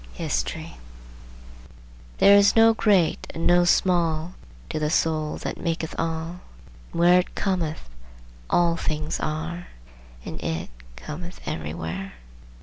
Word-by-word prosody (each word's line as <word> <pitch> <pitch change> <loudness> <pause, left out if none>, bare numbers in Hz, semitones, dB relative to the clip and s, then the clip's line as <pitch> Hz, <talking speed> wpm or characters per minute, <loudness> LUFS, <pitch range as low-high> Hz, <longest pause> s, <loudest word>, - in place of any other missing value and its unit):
HISTORY - - -3 1.4
There 200 +1 +7
is 200 0 +5
no 225 0 +7
great 200 -7 +2
and 165 - -3
no 175 0 +5
small 170 -2 +2 0.4
To - - -2
the 150 0 0
Soul 155 -1 0
that - - -5
maketh 165 -1 -2
all: 165 +2 -3 0.5
And - - -5
where 175 +1 +6
it 180 - -4
cometh, 170 - -2 0.6
all 170 -1 +3
things 155 -1 -2
are 160 +3 -4 0.6
And - - -6
it 80 -5 -3 0.2
cometh 170 - -8
everywhere. 80 +5 -5
165 Hz, 120 wpm, -24 LUFS, 155-175 Hz, 1.4 s, There